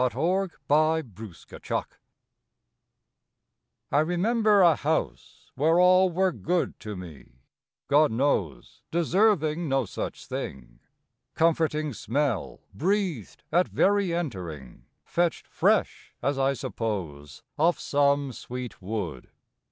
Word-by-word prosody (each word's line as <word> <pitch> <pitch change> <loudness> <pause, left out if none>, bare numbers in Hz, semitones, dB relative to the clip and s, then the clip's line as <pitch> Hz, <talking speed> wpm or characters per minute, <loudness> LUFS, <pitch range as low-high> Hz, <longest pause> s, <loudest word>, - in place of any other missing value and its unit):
the 130 - +3
Valley 185 +7 0 0.5
of 115 - -17
the 110 -5 -11
Elwy - - 0 2.1
I 145 - +3
REMEMBER 205 +6 +3
a 170 -3 +6
house 155 +3 -3
where 160 +5 +3
all 185 +1 +5
were 185 +2 +2
good 175 0 -2
To 105 -1 -6
me, 85 -9 -11 0.5
God 145 0 +4
knows, 110 - -1
deserving 170 -2 +2
no 135 -2 +1
such - - -6
thing: - - -7 0.6
Comforting 155 -3 +1
smell 125 -1 -2
breathed 180 - -2
at 180 +1 +3
very 200 -2 +2
entering, 85 - -5 0.2
Fetched 175 -1 0
fresh, - - 0
as 140 0 0
I 135 +1 +2
suppose, 85 - -5 0.2
off 170 +3 +3
some 140 -1 +1
sweet 125 -2 -7
wood. 95 - -5
145 Hz, 110 wpm, -26 LUFS, 110-175 Hz, 2.1 s, a